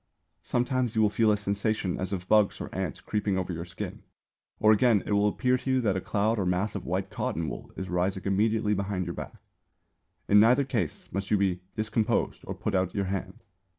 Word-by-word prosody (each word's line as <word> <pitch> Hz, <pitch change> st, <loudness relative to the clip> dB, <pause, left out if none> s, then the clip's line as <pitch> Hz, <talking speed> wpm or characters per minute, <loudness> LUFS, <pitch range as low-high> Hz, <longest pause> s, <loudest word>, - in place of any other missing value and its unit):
Sometimes 125 Hz, -1 st, 0 dB
you 110 Hz, -, +3 dB
will 105 Hz, -, +3 dB
feel 110 Hz, 0 st, +3 dB
a 105 Hz, -, +2 dB
sensation 100 Hz, -1 st, -1 dB
as 95 Hz, 0 st, -2 dB
of 95 Hz, -2 st, -4 dB
bugs 105 Hz, -1 st, +3 dB
or -, -, -7 dB
ants 95 Hz, -6 st, -3 dB
creeping 105 Hz, -2 st, -1 dB
over 90 Hz, -1 st, -2 dB
your 85 Hz, +1 st, -5 dB
skin; 85 Hz, -, -7 dB, 0.6 s
or 110 Hz, -, +6 dB
again, 110 Hz, -1 st, +4 dB
it -, -, -4 dB
will 100 Hz, 0 st, +3 dB
appear 125 Hz, +4 st, +1 dB
to 135 Hz, -, -5 dB
you 130 Hz, -1 st, +3 dB
that 105 Hz, -5 st, +1 dB
a 95 Hz, -, -1 dB
cloud 105 Hz, +4 st, 0 dB
or 95 Hz, -, 0 dB
mass 90 Hz, +4 st, 0 dB
of 100 Hz, -, -6 dB
white 95 Hz, +2 st, -2 dB
cotton 80 Hz, 0 st, -2 dB
wool -, -, -7 dB
is 95 Hz, -, -4 dB
rising 90 Hz, +1 st, -1 dB
immediately 105 Hz, +2 st, +2 dB
behind 100 Hz, -2 st, -2 dB
your 85 Hz, -, -4 dB
back. -, -, -7 dB, 0.9 s
In 105 Hz, -, +6 dB
neither 125 Hz, +6 st, +5 dB
case 115 Hz, -, -3 dB
must 100 Hz, +1 st, -3 dB
you 105 Hz, -, +4 dB
be 95 Hz, -3 st, +1 dB, 0.2 s
discomposed 110 Hz, 0 st, 0 dB
or -, -, -5 dB
put -, -, -3 dB
out 95 Hz, -1 st, 0 dB
your 100 Hz, -1 st, 0 dB
hand. 95 Hz, 0 st, -4 dB
100 Hz, 215 wpm, -28 LUFS, 95-110 Hz, 0.9 s, or